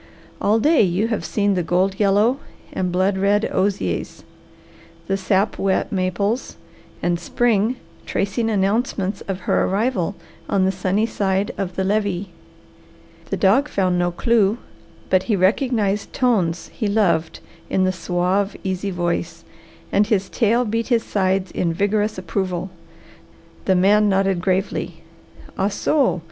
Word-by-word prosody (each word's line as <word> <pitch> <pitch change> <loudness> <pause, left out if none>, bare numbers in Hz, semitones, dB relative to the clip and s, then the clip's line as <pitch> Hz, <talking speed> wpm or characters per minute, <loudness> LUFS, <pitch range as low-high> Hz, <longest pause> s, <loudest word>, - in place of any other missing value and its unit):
All 215 +2 +3
day 305 +6 +4
you 195 +3 +1
have 220 - -2
seen 205 -1 0
the 180 - 0
gold 185 +3 0
yellow 210 +6 +3 0.3
and 180 -1 -1
blood 190 +2 +1
red 205 +2 +2
osiers, 185 - -1 0.8
the 195 - 0
sap 195 +1 0
wet 195 +4 0
maples 200 +5 -1 0.5
and 175 -1 +1
spring 225 +4 +1 0.3
tracing 215 +4 -1
announcements 200 -1 0
of 190 -1 -3
her - - +1
arrival 200 -2 0 0.3
on 190 -2 +2
the 190 - +2
sunny 190 +3 0
side 195 -2 -1
of 185 -3 -4
the 190 - 0
levee." 200 -2 -1 1.0
The - - -1
dog 220 +10 +3
found 185 -2 +1
no 175 0 +2
clew, 215 +3 +2 0.5
but 185 -1 +4
he 215 - +3
recognized 205 +1 +1
tones 190 -10 0
he 220 - -2
loved 170 -6 +1 0.3
in 190 - +1
the 185 - +2
suave, 185 +2 -1
easy 190 +1 -2
voice, 175 -2 -2 0.5
and 205 +1 +3
his 195 -3 0
tail 235 +1 +2
beat 225 +1 -1
his 235 -3 +2
sides 190 -1 0
in 170 -2 -1
vigorous 205 +3 0
approval. 185 0 -3 0.9
The 190 - +3
man 205 +3 +4
nodded 195 -2 +1
gravely. 185 -3 -2 0.6
"Ah, 195 - +2
so! 265 +1 +1
195 Hz, 140 wpm, -21 LUFS, 185-210 Hz, 1.0 s, day